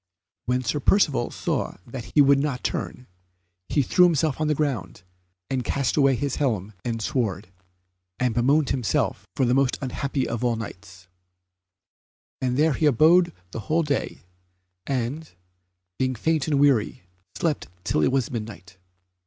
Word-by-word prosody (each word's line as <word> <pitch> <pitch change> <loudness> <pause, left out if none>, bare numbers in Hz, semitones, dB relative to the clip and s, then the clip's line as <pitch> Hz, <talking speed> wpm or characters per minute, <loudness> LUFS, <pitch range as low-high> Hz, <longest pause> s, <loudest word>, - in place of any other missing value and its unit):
When 125 +1 +1
Sir 130 +5 -1
Percivale 145 -6 +2
saw - - -3
that 120 -1 -8
he 150 - +7
would 140 0 +5
not 140 -3 -2
turn, 125 - -3 0.6
he 145 - +2
threw 180 +8 +5
himself 155 -3 +1
on 155 - +1
the 150 - +2
ground, 140 - -3 0.4
and 130 -2 -2
cast 140 -1 -1
away 135 -3 +4
his 140 +2 -2
helm 110 -8 -1
and 115 -2 -2
sword, 105 - -2 0.7
and 125 -2 +1
bemoaned 135 +5 +2
himself 125 -6 -1
for 130 - +2
the 120 - +2
most 135 -1 +2
unhappy 135 0 -2
of 115 +1 -3
all 120 -1 +2
Knights; 95 -4 -9 1.3
and 125 -1 0
there 155 +1 +3
he 155 - +2
abode 160 +6 +5 0.2
the - - -5
whole 165 +2 +3
day, 145 -2 -2 0.6
and, 135 - -3 0.7
being 130 -1 0
faint 160 +5 0
and 145 -3 +2
weary, 135 -10 +2 0.3
slept 160 -4 -1 0.2
till 75 - 0
it 75 - +3
was 135 -3 0
midnight. 105 -6 -7
135 Hz, 155 wpm, -24 LUFS, 120-150 Hz, 1.3 s, he